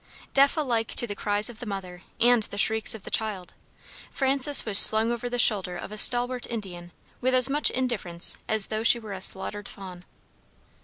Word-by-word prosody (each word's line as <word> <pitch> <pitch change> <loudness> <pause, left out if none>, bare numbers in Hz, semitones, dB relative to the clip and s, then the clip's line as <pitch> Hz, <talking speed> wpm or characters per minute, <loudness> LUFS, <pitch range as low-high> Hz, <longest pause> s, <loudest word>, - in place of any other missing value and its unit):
Deaf 275 +3 +2
alike 235 -7 -2
to - - -1
the 205 - -6
cries 205 +1 0
of 235 -2 -9
the 245 - -8
mother, 185 -3 -8 0.2
and 240 0 +3
the 200 - -10
shrieks 220 +1 0
of 215 - -12
the - - -10
child, 210 -5 -2 0.6
Frances 275 0 +2
was 205 -3 +5
slung 220 +2 +7
over 240 +1 -5
the 245 - -4
shoulder 195 -6 +2
of - - -10
a - - -7
stalwart 245 +1 +2
Indian 180 -7 -8 0.3
with 255 +1 0
as 255 +1 +3
much 295 +2 +2
indifference 225 -10 -4
as 215 -2 0
though 215 - -3
she 230 +1 +3
were 220 -3 -10
a 190 - -9
slaughtered 200 +2 -4
fawn. 185 -3 -12
220 Hz, 195 wpm, -24 LUFS, 195-245 Hz, 0.6 s, slung